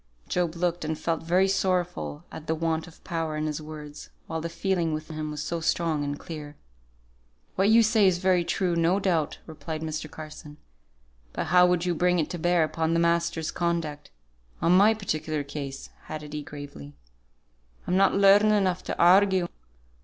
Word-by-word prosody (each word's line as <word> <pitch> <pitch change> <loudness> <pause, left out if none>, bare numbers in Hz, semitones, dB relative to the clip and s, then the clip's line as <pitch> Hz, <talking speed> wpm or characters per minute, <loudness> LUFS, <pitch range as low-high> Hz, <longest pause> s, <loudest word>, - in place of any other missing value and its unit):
Job 175 -2 -1
looked 175 0 -1
and 155 0 -2
felt 165 0 -1
very 180 +4 +2
sorrowful 180 -5 -1
at 160 - -9
the 160 - +1
want 160 0 -1
of 175 - -17
power 165 -2 -3
in 155 - -1
his 155 0 -3
words, 150 -1 -9 0.2
while 160 0 -4
the 170 - -4
feeling 170 -3 -1
within 155 +1 -7
him 155 0 -3
was 150 0 -4
so 170 +3 -3
strong 160 -2 0
and 145 0 -3
clear. 150 -2 -8 1.0
"What 195 +2 +2
you 230 +1 +6
say 220 -2 +4
is 180 -2 +3
very 180 -1 +2
true, 175 +1 0
no 170 +3 +2
doubt," 170 -6 0
replied 155 0 -6
Mr. 155 -1 -4
Carson; 155 -1 -10 0.8
"but - - -2
how 180 0 +7
would 180 -1 +1
you 175 - +1
bring 180 +2 +2
it 160 -1 -1
to 175 - -4
bear 175 0 +3
upon 160 +1 -1
the - - +3
masters' 170 -1 +1
conduct, 165 -4 -2 0.5
on 170 - +2
my 210 +4 +6
particular 155 -7 -2
case?" 140 -1 -7 0.2
added 150 -1 -7
he, 150 - -3
gravely. 145 -1 -10 0.9
"I'm 180 - 0
not 195 +1 +4
learned 200 +2 +6
enough 190 -4 +1
to - - -3
argue. 185 0 +5
165 Hz, 180 wpm, -26 LUFS, 155-180 Hz, 1.0 s, how